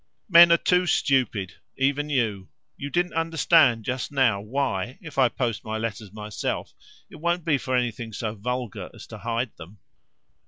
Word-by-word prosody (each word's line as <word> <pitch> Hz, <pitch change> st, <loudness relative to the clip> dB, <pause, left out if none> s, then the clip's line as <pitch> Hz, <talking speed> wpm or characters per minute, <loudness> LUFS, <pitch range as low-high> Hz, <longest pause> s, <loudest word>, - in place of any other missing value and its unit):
"Men 170 Hz, -1 st, +9 dB
are 170 Hz, -, +7 dB
too 180 Hz, +1 st, +2 dB
stupid 120 Hz, -, +1 dB, 0.2 s
even 140 Hz, +2 st, 0 dB
you. 110 Hz, -9 st, -1 dB, 0.3 s
You 140 Hz, -, -6 dB
didn't 175 Hz, +3 st, 0 dB
understand 160 Hz, -7 st, +3 dB
just 130 Hz, +1 st, -3 dB
now 125 Hz, -8 st, +2 dB
why, 120 Hz, -1 st, -2 dB
if 150 Hz, -5 st, -6 dB
I 130 Hz, -2 st, +5 dB
post 115 Hz, -2 st, -2 dB
my 110 Hz, 0 st, -3 dB
letters 110 Hz, -2 st, -5 dB
myself, 105 Hz, -1 st, -4 dB, 0.4 s
it -, -, -11 dB
won't 170 Hz, +1 st, -1 dB
be 150 Hz, -4 st, +2 dB
for 130 Hz, -1 st, -2 dB
anything 120 Hz, -2 st, -2 dB
so 110 Hz, 0 st, -4 dB
vulgar 125 Hz, +1 st, -4 dB
as -, -, -11 dB
to -, -, -10 dB
hide 115 Hz, +1 st, -2 dB
them." 85 Hz, +5 st, -12 dB
125 Hz, 165 wpm, -25 LUFS, 110-145 Hz, 0.4 s, Men